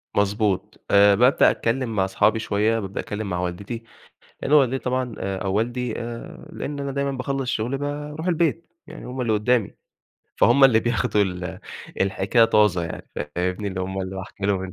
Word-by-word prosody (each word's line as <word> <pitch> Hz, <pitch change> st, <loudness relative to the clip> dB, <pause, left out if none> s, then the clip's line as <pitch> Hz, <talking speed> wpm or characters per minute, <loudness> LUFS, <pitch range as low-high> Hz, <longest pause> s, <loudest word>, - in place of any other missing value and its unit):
مضبوط. 100 Hz, -1 st, 0 dB
آآ 100 Hz, 0 st, +6 dB
بابدأ 125 Hz, +5 st, +5 dB
أتكلّم 115 Hz, -1 st, -1 dB
مع 95 Hz, -1 st, +2 dB
أصحابي 105 Hz, +3 st, +2 dB
شوية، 110 Hz, +2 st, +1 dB
بابدأ 95 Hz, -1 st, -5 dB
أتكلم 105 Hz, -1 st, -4 dB
مع 90 Hz, 0 st, -2 dB
والدتي، 100 Hz, +6 st, -4 dB, 0.6 s
لأن 140 Hz, -, -3 dB
والدتي 135 Hz, -3 st, +5 dB
طبعًا 125 Hz, -1 st, -1 dB
آآ 95 Hz, 0 st, -3 dB
أو 95 Hz, -1 st, -2 dB
والدي 120 Hz, +2 st, -1 dB
آآ 115 Hz, 0 st, -8 dB
لأن 145 Hz, -1 st, -5 dB
أنا 140 Hz, 0 st, -3 dB
دايمًا 140 Hz, 0 st, -1 dB
باخلص 135 Hz, 0 st, -3 dB
شغلي 120 Hz, +5 st, -1 dB
باروح 150 Hz, +3 st, -4 dB
البيت، 170 Hz, -1 st, +1 dB, 0.2 s
يعني -, -, -10 dB
هُم 125 Hz, +1 st, -5 dB
اللي 115 Hz, -3 st, +1 dB
قدّامي، 110 Hz, +1 st, +1 dB, 0.6 s
فهُم 135 Hz, +3 st, +5 dB
اللي 115 Hz, -4 st, +6 dB
بياخدوا 115 Hz, -3 st, +1 dB
ال 90 Hz, -2 st, -4 dB, 0.4 s
الحكاية 100 Hz, +4 st, +3 dB
طازة 105 Hz, -6 st, +3 dB
يعني 85 Hz, -, -7 dB
ف -, -, -5 dB, 0.2 s
فاهمني؟ 90 Hz, +3 st, -1 dB
اللي 95 Hz, -1 st, -4 dB
هُم 95 Hz, +1 st, -3 dB
اللي 95 Hz, +1 st, -6 dB
باحكي 95 Hz, +1 st, -5 dB
لهم 95 Hz, -2 st, 0 dB
ال 95 Hz, -, -7 dB
110 Hz, 180 wpm, -23 LUFS, 95-130 Hz, 0.6 s, آآ